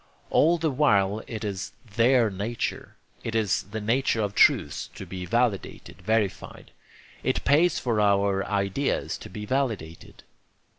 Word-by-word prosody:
All 170 Hz, +3 st, +4 dB
the 160 Hz, -2 st, 0 dB
while 105 Hz, -7 st, +2 dB
it 110 Hz, -2 st, -6 dB
is 100 Hz, -3 st, -4 dB, 0.2 s
THEIR 120 Hz, -1 st, +4 dB
nature. 105 Hz, +5 st, -4 dB, 0.3 s
It 115 Hz, -, -4 dB
is 110 Hz, -4 st, +1 dB
the 110 Hz, +1 st, -4 dB
nature 115 Hz, +1 st, +1 dB
of 100 Hz, -1 st, -2 dB
truths -, -, +3 dB
to -, -, -8 dB
be 90 Hz, -1 st, -6 dB
validated, 100 Hz, -6 st, -1 dB
verified. 110 Hz, 0 st, -2 dB, 0.5 s
It -, -, -1 dB
pays 160 Hz, +5 st, +4 dB
for 115 Hz, -4 st, 0 dB
our 100 Hz, -1 st, +2 dB
ideas 100 Hz, +7 st, -1 dB
to -, -, -10 dB
be 105 Hz, -, -7 dB
validated. 110 Hz, -, -3 dB
110 Hz, 140 wpm, -26 LUFS, 100-125 Hz, 0.5 s, All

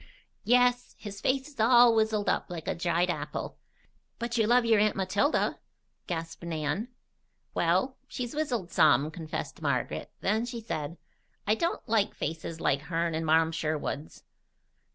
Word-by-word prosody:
"Yes. 245 Hz, 0 st, +3 dB
His 200 Hz, -2 st, -8 dB
face 265 Hz, +1 st, +1 dB
is 290 Hz, -5 st, -16 dB
all 240 Hz, +1 st, +7 dB
wizzled 220 Hz, -2 st, +1 dB
up -, -, 0 dB
like 170 Hz, -3 st, -6 dB
a -, -, +1 dB
dried 170 Hz, +1 st, +1 dB
apple." 150 Hz, -2 st, -5 dB, 0.6 s
"But 235 Hz, +1 st, -3 dB
you 225 Hz, -3 st, +2 dB
love 245 Hz, +1 st, +4 dB
your 225 Hz, -2 st, +4 dB
aunt 210 Hz, 0 st, +3 dB
Matilda?" 200 Hz, +10 st, +1 dB, 0.5 s
gasped 165 Hz, -2 st, -4 dB
Nan. 160 Hz, +5 st, -2 dB, 0.7 s
"Well, 185 Hz, +10 st, +1 dB
she's 245 Hz, -3 st, -5 dB
wizzled 250 Hz, -, -2 dB
some," 150 Hz, 0 st, +4 dB
confessed 160 Hz, -1 st, -6 dB
Margaret. -, -, -1 dB
Then 220 Hz, +4 st, +1 dB
she 240 Hz, -1 st, -5 dB
said: 165 Hz, -7 st, -4 dB, 0.5 s
"I 210 Hz, -, +3 dB
don't 335 Hz, +7 st, -2 dB
like 220 Hz, -3 st, +1 dB
faces 160 Hz, +1 st, -4 dB
like 140 Hz, -3 st, +1 dB
hern 165 Hz, +2 st, -1 dB
and 160 Hz, 0 st, -2 dB
Marm 160 Hz, +1 st, +4 dB
Sherwood's. 155 Hz, -2 st, -3 dB
195 Hz, 150 wpm, -29 LUFS, 160-235 Hz, 0.7 s, all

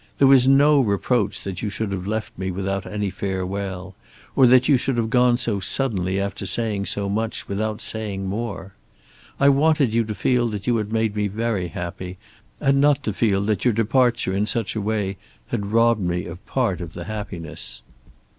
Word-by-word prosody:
There 140 Hz, -, +5 dB
was 130 Hz, -2 st, +6 dB
no 140 Hz, +2 st, +6 dB
reproach 105 Hz, 0 st, 0 dB
that 95 Hz, -2 st, -5 dB
you 110 Hz, -, -2 dB
should 100 Hz, 0 st, -3 dB
have 95 Hz, -1 st, -4 dB
left 110 Hz, +1 st, -3 dB
me 95 Hz, +1 st, -3 dB
without 95 Hz, +1 st, -3 dB
any 105 Hz, -2 st, -2 dB
farewell, 95 Hz, 0 st, -4 dB, 0.4 s
or 130 Hz, -, +6 dB
that 125 Hz, +1 st, +5 dB
you 145 Hz, -, +5 dB
should 130 Hz, 0 st, -1 dB
have 115 Hz, -1 st, -1 dB
gone 125 Hz, -1 st, +4 dB
so 115 Hz, -5 st, -1 dB
suddenly, 95 Hz, -3 st, 0 dB
after 100 Hz, 0 st, -3 dB
saying 105 Hz, 0 st, -1 dB
so 100 Hz, -1 st, -1 dB
much, 110 Hz, +3 st, -2 dB
without 105 Hz, +2 st, -2 dB
saying 105 Hz, -3 st, -2 dB
more. 100 Hz, -1 st, -4 dB, 0.7 s
I 140 Hz, -, +5 dB
wanted 140 Hz, -3 st, +3 dB
you 115 Hz, 0 st, +3 dB
to 105 Hz, -1 st, -4 dB
feel 120 Hz, +5 st, +1 dB
that 105 Hz, -3 st, -5 dB
you 120 Hz, -, +2 dB
had 105 Hz, -1 st, -3 dB
made 110 Hz, -2 st, 0 dB
me 105 Hz, -1 st, 0 dB
very 105 Hz, -2 st, -2 dB
happy, 90 Hz, +2 st, -6 dB, 0.4 s
and 140 Hz, -1 st, +3 dB
not 145 Hz, -1 st, +3 dB
to 105 Hz, -, -2 dB
feel 100 Hz, -2 st, +1 dB
that 105 Hz, 0 st, 0 dB
your 120 Hz, -4 st, +2 dB
departure 115 Hz, -2 st, +2 dB
in 100 Hz, +2 st, 0 dB
such 115 Hz, -2 st, -1 dB
a 110 Hz, -, -1 dB
way 100 Hz, -2 st, -1 dB, 0.3 s
had 100 Hz, 0 st, -3 dB
robbed 115 Hz, -1 st, +3 dB
me 90 Hz, -1 st, -1 dB
of 85 Hz, +3 st, -9 dB
part 115 Hz, -9 st, 0 dB
of 85 Hz, -2 st, -7 dB
the 85 Hz, -, -6 dB
happiness. 100 Hz, -5 st, -5 dB
105 Hz, 195 wpm, -22 LUFS, 95-120 Hz, 0.7 s, was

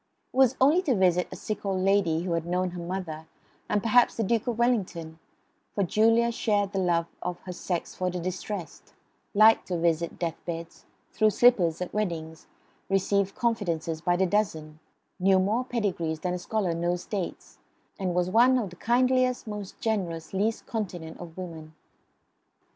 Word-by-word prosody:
It -, -, -8 dB
was 265 Hz, -1 st, +5 dB
only 295 Hz, +7 st, +5 dB
to 280 Hz, -9 st, +1 dB
visit 180 Hz, -2 st, +3 dB
a -, -, -6 dB
sick 215 Hz, -, -5 dB
old 190 Hz, -2 st, -1 dB
lady 190 Hz, -5 st, +2 dB
who 180 Hz, -, -3 dB
had 165 Hz, 0 st, -1 dB
known 180 Hz, +1 st, 0 dB
her 175 Hz, -1 st, -6 dB
mother 170 Hz, -3 st, -5 dB, 0.4 s
and 205 Hz, -, +1 dB
perhaps 240 Hz, +2 st, +4 dB
the 225 Hz, -, +1 dB
Duke 225 Hz, +3 st, 0 dB
of 235 Hz, -2 st, -1 dB
Wellington; 180 Hz, -9 st, -1 dB, 0.6 s
for 200 Hz, -, +2 dB
Julia 225 Hz, +5 st, +3 dB
shared 205 Hz, -4 st, 0 dB
the 195 Hz, -, -1 dB
love 170 Hz, -2 st, +2 dB, 0.2 s
of 180 Hz, 0 st, -4 dB
her 185 Hz, -, -7 dB
sex 175 Hz, -1 st, -3 dB
for 185 Hz, 0 st, -1 dB
the 180 Hz, 0 st, -4 dB
distressed; 185 Hz, +1 st, -6 dB, 0.4 s
liked 215 Hz, +2 st, +6 dB
to 180 Hz, -, -1 dB
visit 170 Hz, 0 st, 0 dB
death 170 Hz, -2 st, -4 dB
beds; 170 Hz, -1 st, -7 dB, 0.3 s
threw 215 Hz, -, +4 dB
slippers 190 Hz, -8 st, +3 dB
at 180 Hz, -, -8 dB
weddings; 165 Hz, -6 st, -3 dB, 0.4 s
received 195 Hz, 0 st, +1 dB
confidences 170 Hz, -9 st, -1 dB
by 175 Hz, +1 st, +2 dB
the 190 Hz, +2 st, +2 dB
dozen; 160 Hz, -6 st, -1 dB, 0.4 s
knew 190 Hz, +1 st, +4 dB
more 210 Hz, +6 st, +1 dB
pedigrees 185 Hz, -10 st, -2 dB
than 180 Hz, -1 st, -1 dB
a 180 Hz, -, -3 dB
scholar 190 Hz, -2 st, -1 dB
knows 175 Hz, +1 st, -1 dB
dates, 200 Hz, -6 st, -5 dB, 0.4 s
and 185 Hz, -2 st, -1 dB
was 180 Hz, 0 st, +2 dB
one 245 Hz, +4 st, +5 dB
of 210 Hz, -7 st, -2 dB
the 180 Hz, -, -13 dB
kindliest, 255 Hz, +2 st, +2 dB
most 210 Hz, -3 st, -7 dB
generous, 180 Hz, -8 st, -2 dB
least 210 Hz, +4 st, 0 dB
continent 175 Hz, -7 st, -5 dB
of 170 Hz, -1 st, -10 dB
women. 160 Hz, -4 st, -8 dB
185 Hz, 170 wpm, -27 LUFS, 170-215 Hz, 0.6 s, liked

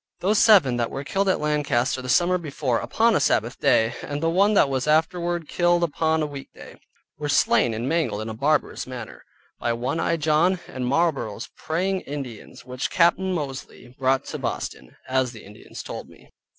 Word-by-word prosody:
Those 205 Hz, +3 st, +2 dB
seven 180 Hz, -, +5 dB
that 120 Hz, -1 st, -1 dB
were 135 Hz, -, -5 dB
killed 195 Hz, +6 st, 0 dB
at 185 Hz, -, +2 dB
Lancaster 145 Hz, -4 st, 0 dB
the 125 Hz, -, -7 dB
summer 175 Hz, +6 st, +3 dB
before 140 Hz, -6 st, -2 dB
upon 230 Hz, 0 st, +2 dB
a -, -, +3 dB
Sabbath 115 Hz, +3 st, 0 dB
day, 110 Hz, +1 st, +3 dB
and 145 Hz, 0 st, -4 dB
the 165 Hz, +2 st, 0 dB
one 200 Hz, +4 st, +3 dB
that 195 Hz, -, +5 dB
was 135 Hz, 0 st, -2 dB
afterward 170 Hz, +1 st, +1 dB
killed 175 Hz, 0 st, +2 dB
upon 160 Hz, 0 st, +1 dB
a -, -, 0 dB
weekday, 140 Hz, -2 st, -10 dB, 0.4 s
were 145 Hz, -1 st, -3 dB
slain 120 Hz, -4 st, +3 dB
and 115 Hz, +3 st, -3 dB
mangled 135 Hz, -10 st, 0 dB
in -, -, -7 dB
a 110 Hz, -, -4 dB
barbarous 145 Hz, +5 st, 0 dB
manner, 125 Hz, -4 st, -8 dB, 0.4 s
by 120 Hz, -, 0 dB
one 125 Hz, +7 st, -2 dB
eyed 165 Hz, -1 st, 0 dB
John, 160 Hz, +4 st, +3 dB
and 125 Hz, -1 st, -4 dB
Marlborough's 140 Hz, -7 st, -1 dB
Praying 185 Hz, +4 st, -1 dB
Indians, 135 Hz, -8 st, -8 dB
which 125 Hz, 0 st, -3 dB
Capt. 170 Hz, +1 st, +3 dB
Mosely 150 Hz, -10 st, -5 dB
brought 130 Hz, 0 st, +1 dB
to -, -, -6 dB
Boston, -, -, -5 dB
as 130 Hz, -1 st, 0 dB
the 110 Hz, -, -12 dB
Indians 105 Hz, +1 st, -11 dB
told -, -, -7 dB
me. -, -, -19 dB
145 Hz, 185 wpm, -24 LUFS, 125-170 Hz, 0.4 s, seven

